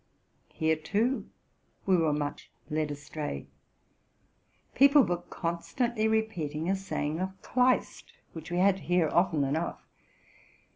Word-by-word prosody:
Here, 160 0 +1
too, 215 - -1 0.6
we 190 - +4
were 165 -3 +2
much 145 0 -3 0.2
led 155 0 0
astray. 145 - -5 1.3
People 280 +1 +7
were 175 -4 -1
constantly 215 +7 -1
re 220 0 +2
peating 160 -3 -3
a - - +2
saying 165 -5 -3
of 190 +1 -4
Kleist, 255 - +1 0.2
which 160 0 -8
we 175 - -2
had 190 +1 +4
to - - -12
hear 175 -3 +2
often 175 -4 +2
enough. 155 +5 -1
175 Hz, 130 wpm, -29 LUFS, 155-210 Hz, 1.3 s, People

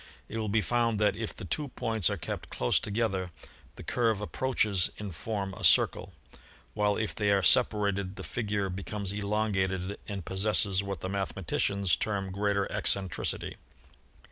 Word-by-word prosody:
It 115 - -4
will 110 -1 -1
be 110 +2 +3
found 115 -1 +1
that 105 -2 +3
if 110 0 -4
the - - -7
two 145 - -2
points 110 - 0
are - - -2
kept - - -5
close 60 - +2
together 100 -4 -1 0.5
the - - -9
curve 115 -4 +1
approaches 105 -4 +1
in 105 -2 -5
form 95 +3 -3
a - - -9
circle, 95 0 +4 0.6
while 105 -1 +2
if 110 -1 -1
they 105 -2 0
are 100 -1 +3
separated 100 +1 +3
the - - -7
figure 105 -4 -1
becomes 100 +1 -3
elongated 100 -2 -1
and 100 -5 -5
possesses 100 0 +1
what 100 -3 -5
the 95 - -3
mathematicians 100 -1 0
term 100 -3 -2
greater 100 0 +1
eccentricity. 95 -2 -1
100 Hz, 155 wpm, -30 LUFS, 95-105 Hz, 0.6 s, circle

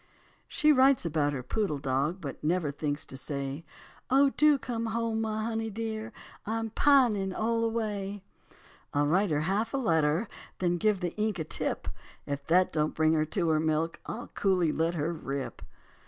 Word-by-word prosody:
She 305 -2 +3
writes 265 -5 +5
about 150 -3 +1
her 135 -3 -4
poodle 190 - -1
dog; 140 +6 -1
But 140 -4 -7
never 160 -1 +1
thinks 145 0 -3
to - - -9
say, 140 +2 -4 0.5
"Oh, 275 +1 +5
do 300 0 +4
come 230 -3 -3
home, 225 0 -1
my 220 -1 -2
honey 225 0 -2
dear, 220 +1 -4 0.3
I'm 225 +1 -3
pining 230 -9 +3
all 230 +1 0
away." 205 -3 -2 0.7
I'll 145 0 +3
write 185 +7 +2
her 150 -1 +1
half 205 - 0
a - - +2
letter, 165 - +2 0.3
Then 175 -1 +1
give 210 0 +1
the 175 -1 -3
ink 215 -1 0
a 160 - -2
tip. 155 - -3 0.4
If 140 0 -5
that 180 +2 +3
don't 155 -1 0
bring 155 0 +3
her 155 -1 +2
to 170 +2 -1
her 155 -1 +3
milk 160 +1 0
I'll 240 - -6
coolly 180 -5 +1
let 165 +3 0
her 160 +2 -1
rip. 140 -4 -5
185 Hz, 175 wpm, -29 LUFS, 155-225 Hz, 0.7 s, writes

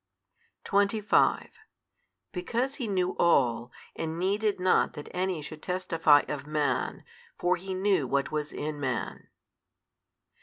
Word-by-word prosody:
25 200 +1 +2 0.8
Because 235 +8 -2
He 250 -6 -3
knew 185 -3 0
all, 125 -7 +3 0.2
and 160 0 -4
needed 200 +3 0
not 185 0 +3
that 150 -2 -8
any 180 -3 -2
should 155 +1 -9
testify 165 -5 +3
of 145 -1 -5
man; 150 -1 -1 0.3
for 180 +1 +2
He 190 +1 -5
knew 190 -7 +1
what 140 +2 0
was 150 -1 -2
in 150 0 -4
man. 130 -4 -3
175 Hz, 120 wpm, -28 LUFS, 150-195 Hz, 0.8 s, all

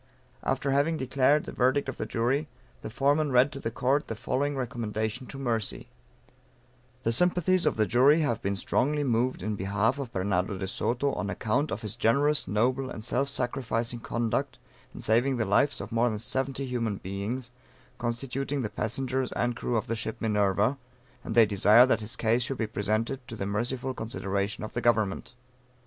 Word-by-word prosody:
After 140 - -1
having 145 +4 +2
declared 135 +2 +2
the - - -7
verdict 130 +3 +1
of 135 - -5
the - - -3
Jury, 130 +6 0 0.3
the - - -6
Foreman 145 +5 +1
read 125 +3 +4
to 140 - -7
the 115 - -2
Court 130 +5 0
the 115 - -4
following 135 +4 -1
recommendation 115 -1 -3
to 135 - -8
mercy: 115 -5 -2 1.1
"The 115 - +1
sympathies 180 +6 +2
of - - +2
the 110 - +2
Jury 135 +8 +5
have 120 -7 0
been 100 +1 -1
strongly 145 +9 0
moved 125 -3 0
in 105 +1 -1
behalf 100 +7 0
of 130 -4 -5
Bernardo 95 0 -1
de 95 0 -4
Soto, 125 +7 -1
on 100 - -3
account 110 +8 0
of - - -4
his 105 - -4
generous, 145 +6 +3
noble 125 +6 +1
and 110 - -7
self 135 +3 0
sacrificing 120 -2 -1
conduct 120 +4 -2 0.3
in - - -9
saving 120 +4 +2
the 110 - 0
lives 105 +8 +2
of 100 +3 -7
more 115 +2 +2
than 110 - -3
70 130 +4 -1
human 115 -5 -2
beings, 105 +7 -4 0.5
constituting 135 +3 -2
the 105 - -3
passengers 130 +3 -2
and 120 0 0
crew 120 0 -1
of 110 - -1
the 115 - -2
ship 110 0 -4
Minerva; 105 +4 +1 0.4
and 110 - -4
they 115 -1 +8
desire 105 +3 +6
that 115 -4 +1
his 105 +1 -5
case 115 +2 +1
should 130 +2 -1
be 115 - 0
presented 110 +4 -1
to 115 - -7
the 100 - -3
merciful 120 +6 -2
consideration 100 -3 -3
of 110 - -6
the 120 - -2
Government." 110 0 0
120 Hz, 185 wpm, -28 LUFS, 110-135 Hz, 1.1 s, they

